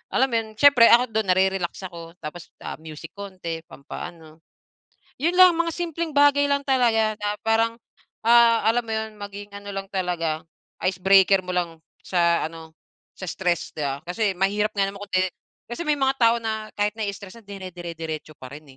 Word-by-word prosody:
alam 265 - +4
mo - - 0
'yon 225 - -6
siyempre 275 -1 +7
ako 240 - +2
do'n 220 -1 0
na-re-relax 190 -1 +2 0.2
ako 170 - -9 0.2
tapos 155 +2 -8
ah, - - -5
music 155 -1 -10
konti 185 -5 -6
pampa-ano. 155 +2 -10 0.8
Yun 330 +6 +1
lang 370 -1 +10
mga 335 0 0
simpleng 335 -1 -3
bagay 285 0 +5
lang 280 0 +1
talaga 230 -5 +2
na 205 0 0
parang, 225 +1 +2 0.5
ah, 230 -2 +6
alam 235 +2 +3
mo 230 - -10
yun? 220 0 -3
Maging 205 0 -9
ano 200 0 -8
lang 195 0 -5
talaga, 175 -5 -2 0.4
icebreaker 190 +1 +4
mo 180 -1 -5
lang 170 -2 -2 0.2
sa 170 -2 +2
ano, 160 -1 -12 0.4
sa - - -17
stress 175 -3 -1
'di 155 - -6
ba? 140 +1 -4
Kasi 190 +4 -1
mahirap 205 +3 0
nga 200 - +1
naman 200 - -11
kung 205 - -9
'di 185 0 +2 0.4
kasi 240 - -5
may 300 - +3
mga 270 -1 +1
tao 230 0 +5
na 220 -1 -3
kahit 210 0 +1
nai-stress 200 0 -5
na - - -25
dinedire-diretso 170 -5 -7
pa 130 -1 -11
rin 145 -2 -12
200 Hz, 180 wpm, -24 LUFS, 175-230 Hz, 0.8 s, lang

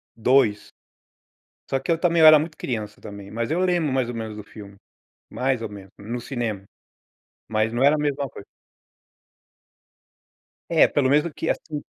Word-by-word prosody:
2, 115 -2 +2 1.0
só 135 - 0
que 135 - -3
eu 165 - +2
também 170 -1 +2
eu 155 - +9
era 155 -1 +9
muito 155 +1 -5
criança 110 -4 -5
também, 100 -1 -10
mas 115 +3 -3
eu 165 - +1
lembro 175 -5 +1
mais 130 -2 0
ou 120 - -5
menos 110 -2 -5
do 105 - -8
filme, 100 -1 -12 0.6
mais 130 -2 -1
ou 115 - -3
menos, 100 -2 -12
no 115 +4 -5
cinema. 115 -7 -4 0.9
Mas 110 0 0
não 120 +2 0
era 145 +2 +5
a - - -2
mesma 145 -2 -1
coisa. - - -12 2.2
É, 165 -2 +5
pelo 135 -3 +1
menos, 150 +2 +4
porque 170 -3 -4
assim 150 -2 -3
130 Hz, 170 wpm, -23 LUFS, 110-150 Hz, 2.2 s, eu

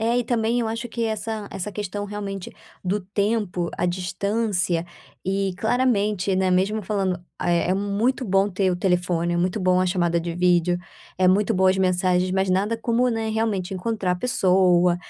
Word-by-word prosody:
É, 235 +2 +2
e 245 - 0
também 230 0 0
eu 235 - 0
acho 230 +2 -4
que 235 0 -2
essa 220 -1 -3
essa 195 +2 -4
questão, 205 0 -4
realmente, 200 -2 -5 0.3
do 190 +3 0
tempo, 200 -2 -1
a - - -1
distância 185 0 -1 0.4
e 195 0 0
claramente, 210 -5 +1
né, 185 0 +1
mesmo 195 +4 +1
falando, 195 -2 0 0.3
eh, 175 0 +1
é - - +3
muito 205 +7 0
bom 195 -1 +2
ter 190 -1 0
o 180 - -1
telefone, 175 -2 0
é - - 0
muito 180 +4 0
bom 185 0 +3
a 185 - +2
chamada 175 -2 +1
de 170 0 -4
vídeo, 175 0 +2 0.4
é 185 -1 +4
muito 205 +4 +3
boa 190 -2 +3
as 185 - +3
mensagens, 185 -1 +2
mas 190 +1 +1
nada 195 +4 +1
como, 235 +2 +1
né, 225 -1 -2
realmente 215 -4 -1
encontrar 195 -1 -1
a - - -2
pessoa 180 -4 +3
195 Hz, 185 wpm, -23 LUFS, 180-215 Hz, 0.4 s, é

